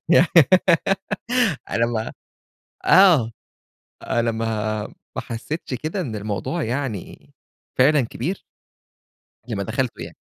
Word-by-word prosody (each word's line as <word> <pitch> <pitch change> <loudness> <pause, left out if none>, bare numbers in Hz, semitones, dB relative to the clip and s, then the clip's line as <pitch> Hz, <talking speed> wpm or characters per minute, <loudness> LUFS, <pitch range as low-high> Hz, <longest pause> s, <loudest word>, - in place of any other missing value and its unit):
يعني 170 0 +5 1.4
أنا 115 - +2
ما 115 -1 -3 0.7
آه 160 - +6 0.7
أنا 115 -1 0
ما 110 -1 -2 0.3
ما - - -2
حسيتش 130 +5 -5
كده 155 - -3
إن 115 -9 -4
الموضوع 105 - -3
يعني 120 -5 -5 0.5
فعلًا 145 +2 +5
كبير. 140 +10 -4 1.1
غير 115 - -3
لمّا 100 - -2
دخلته 125 +3 -2
يعني. - - -10
120 Hz, 105 wpm, -22 LUFS, 110-150 Hz, 1.4 s, آه